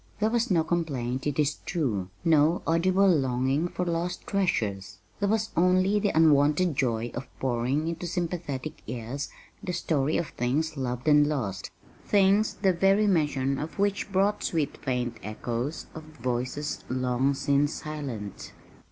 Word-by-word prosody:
There 215 +1 +2
was 235 +1 +1
no 170 -5 +3
complaint, 140 -7 -2
it 145 - -2
is 150 -1 +1
true, 110 - -1 0.2
no 160 +1 +4
audible 185 +4 +3
longing 135 -1 +2
for 180 +1 -3
lost 170 +1 -2
treasures. 100 - -1 0.2
There 200 -1 +1
was 220 +1 0
only 185 +4 +3
the 205 0 +1
unwonted 155 +1 +4
joy 120 -3 0
of 125 - -6
pouring 130 +4 0
into 170 +1 -3
sympathetic 165 -5 -4
ears 125 +4 -4 0.3
the 180 - -4
story 155 -4 0
of 165 - -2
things 150 +6 -1
loved 125 -1 -3
and 150 -1 +6
lost 105 -11 -3 0.3
things 200 +1 +3
the 190 -1 +5
very 195 +4 +3
mention 145 -7 +1
of 155 - -6
which 200 0 0
brought 200 +2 +1
sweet 160 -4 -1
faint 125 -3 -2
echoes 120 +7 -4
of 160 - -7
voices 130 0 -3
long 130 +2 +1
since 140 +2 +2
silent. 135 -10 -6
150 Hz, 145 wpm, -27 LUFS, 130-180 Hz, 0.3 s, and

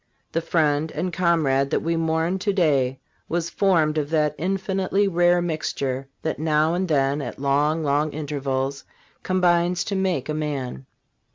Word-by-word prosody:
The 165 - 0
friend 155 -2 +1
and 175 +3 -3
comrade 155 -7 +2
that - - 0
we 165 +1 0
mourn 165 +3 0
to 200 +2 0
day 140 -9 +1 0.3
was 170 0 -1
formed 160 -6 +2
of 145 -1 -3
that 150 -2 +1
infinitely 195 +2 0
rare 175 -1 +3
mixture 140 -5 -2 0.2
that 160 - -2
now 155 +1 +2
and 185 +2 0
then 140 -2 +1
at - - -6
long, 145 +3 +1
long 145 +1 +1
intervals 140 -2 -3 0.4
combines 180 -1 +2
to 200 - -3
make 185 -8 0
a 155 - -2
man. 140 - -4
155 Hz, 155 wpm, -23 LUFS, 145-175 Hz, 0.4 s, rare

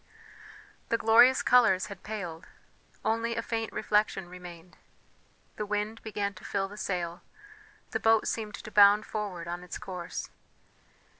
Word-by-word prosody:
The 230 - +2
glorious 235 +4 +6
colours 230 -7 +5
had 200 - -9
paled, 180 -6 -6 0.6
only 230 +1 0
a 230 - -2
faint 225 -1 -3
reflection 210 -3 0
remained; 180 -1 -11 0.8
the 210 - -2
wind 210 +2 -2
began 205 -2 -3
to 185 - -14
fill 195 -1 -1
the 200 - -11
sail, 175 -4 -3 0.7
the - - -1
boat 225 -1 +3
seemed 215 -2 -3
to 215 - -10
bound 205 +1 +6
forward 195 -6 -5
on 175 +1 -5
its 180 - -6
course. 180 -3 -6
205 Hz, 140 wpm, -29 LUFS, 180-220 Hz, 0.8 s, glorious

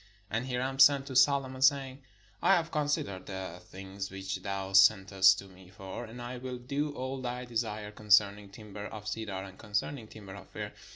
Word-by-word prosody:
And 115 +4 -1
Hiram 130 +1 -2
sent 135 0 +7
to 130 - -7
Solo 135 +1 +5
mon, 130 0 -9
saying: 135 0 +3 0.4
"I 195 - +5
have 165 -2 -1
considered 145 - -1
the 95 -3 -6
things 95 +2 -7
which 95 0 -4
thou 95 0 -4
sen 95 +1 +6
test 95 0 +5
to 100 - -7
me 95 -1 -16
for: 95 +4 -8
and 115 +2 -10
I 120 +1 -6
will 125 0 -5
do 140 +4 -2
all 130 +1 -4
thy 125 0 -4
desire 110 -3 -3
concern 105 -1 +4
ing 100 -1 -13
timber 105 0 -9
of 105 -1 -9
cedar, 105 -3 -4
and 95 0 -12
concerning 110 +3 -3
timber 100 -3 -11
of 100 -1 -11
fir. - - -6
110 Hz, 195 wpm, -30 LUFS, 95-130 Hz, 0.4 s, sent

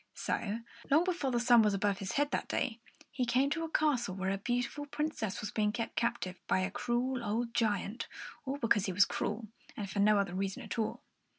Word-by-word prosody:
So, 220 +1 -2 0.3
long 310 +4 +5
before 345 -7 0
the 240 -2 +1
sun 240 -1 +6
was 210 -2 +3
above 200 -1 +1
his 190 -1 -3
head 290 +1 +1
that - - -1
day, 235 -3 -1 0.3
he 260 - -1
came 255 +3 +2
to 330 +1 0
a 325 - -3
castle 265 -11 +1
where 190 0 -1
a 195 - -1
beautiful 245 +6 -2
Princess 295 -9 -2
was 210 - -4
being 210 -1 +1
kept 230 +1 -3
captive 235 -6 -1
by - - +3
a 190 +1 -1
cruel 245 +3 -1
old 230 +2 -1
giant, 215 -1 0 0.4
all 275 +1 -3
because 215 -6 +2
he 190 - -1
was 200 +2 +6
cruel, 215 +1 -3 0.3
and 205 - -3
for 200 - -2
no 210 +1 +5
other 195 -3 0
reason 195 +1 -2
at - - -4
all. 220 - -2
230 Hz, 215 wpm, -33 LUFS, 200-255 Hz, 0.4 s, sun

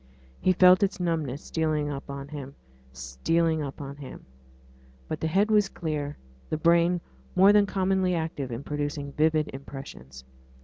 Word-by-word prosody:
He 185 - +3
felt 180 0 +6
its 200 -1 0
numbness 160 -6 -2
stealing 155 -2 -1
up 140 0 -7 0.2
him 140 -2 -7 0.4
stealing 155 - 0
up 140 0 -6 0.2
him. 135 - -10 0.8
But 155 - -4
the 160 - -1
head 200 +6 +2
was 210 -2 +4
clear, 150 -5 -4 0.3
the 155 - -1
brain 170 +1 +3 0.3
more 195 +3 +7
than 205 -1 +5
commonly 190 -1 +1
active 160 -5 -3
in 120 +4 -5
producing 145 -1 -3
vivid 155 +1 +1
impressions. 135 - -10
155 Hz, 140 wpm, -27 LUFS, 140-180 Hz, 0.8 s, more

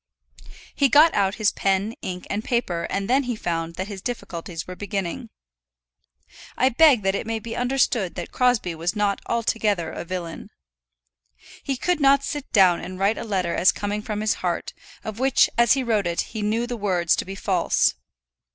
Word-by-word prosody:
He 280 -2 +2
got 305 +6 +6
out 195 -1 +1
his 215 -2 +2
pen, 195 +3 0
ink, 180 -1 -5
and 210 +2 -3
paper, 180 -10 -1
and 195 0 -2
then 265 +2 +2
he 245 -1 -2
found 165 -4 -3
that 190 +2 -4
his 200 -3 -7
difficulties 175 -7 -5
were 180 - -8
beginning. 205 +4 -4 1.3
I 260 - +4
beg 265 -4 +5
that 195 0 +1
it 205 - -3
may 225 0 -1
be 225 +1 -6
understood 245 -6 0
that - - -6
Crosbie 245 -8 +1
was 165 +2 -2
not 205 -1 0
altogether 215 -7 0
a - - -6
villain. 175 -1 -6 1.1
He 270 -2 -3
could 355 +5 0
not 275 -1 +4
sit 290 0 -5
down 185 -4 +5
and 185 0 -7
write 200 +3 +1
a - - -4
letter 185 -6 -1
as 180 - +4
coming 205 +1 -3
from 210 0 -4
his 215 -1 +2
heart, 175 -2 -2 0.3
of 220 0 -6
which 265 0 +3
as 235 -1 +5
he 265 -1 0
wrote 215 -6 +1
it 170 0 0
he 220 - -6
knew 220 +3 0
the 240 0 -5
words 180 -5 +1
to - - -1
be 195 +1 -7
false. 190 - +1
210 Hz, 190 wpm, -23 LUFS, 185-240 Hz, 1.3 s, got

